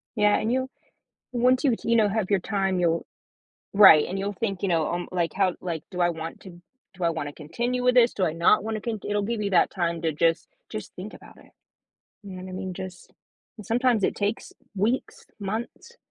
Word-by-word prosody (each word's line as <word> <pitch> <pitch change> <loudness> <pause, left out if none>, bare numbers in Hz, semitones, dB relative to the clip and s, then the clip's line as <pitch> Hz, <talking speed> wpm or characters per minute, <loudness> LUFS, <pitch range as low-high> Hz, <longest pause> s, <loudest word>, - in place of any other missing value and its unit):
Yeah, 210 0 +4
and 225 - -1
you'll 260 +1 0 0.6
and 240 -1 -2
once 255 +3 +4
you 255 -4 +4
you 235 0 +3
know, 215 -2 +4
have 210 -1 -1
your 195 -2 +3
time, 195 -1 -1
you'll 170 -1 +1 0.7
Right, 190 -7 +8
and 195 - -4
you'll 200 +1 -2
think, 195 -2 -3
you - - +2
know, 165 -3 +2
um, 175 0 -3
like, 170 -2 0
"How? 190 -2 +1
Like, 165 -4 -4
do 180 -1 -3
I 175 - +4
want 160 0 -6
to 190 - -11 0.4
do 180 -1 -7
I - - +3
want 155 -3 -3
to - - -11
continue 240 +12 -3
with 250 0 +4
this? 240 -1 +5
Do 190 - 0
I 160 - -1
not 170 +5 +3
want 225 - -2
to 215 - -4
cont" 220 -4 -4
It'll 205 0 +1
give 225 0 -2
you 200 -1 -2
that 175 - +4
time 170 -3 -2
to 160 - 0
just 165 +2 +1 0.2
just - - -7
think - - -8
about - - -14
it. - - -19 0.7
You 200 - -9
know 185 0 -7
what 185 - -8
I - - -8
mean? 185 0 -5
Just 185 0 -9 0.4
and 210 - -10
sometimes 240 -2 +2
it - - +1
takes 205 +2 -3 0.2
weeks, 220 +7 -1
months 225 - -5
195 Hz, 230 wpm, -25 LUFS, 175-225 Hz, 0.7 s, Right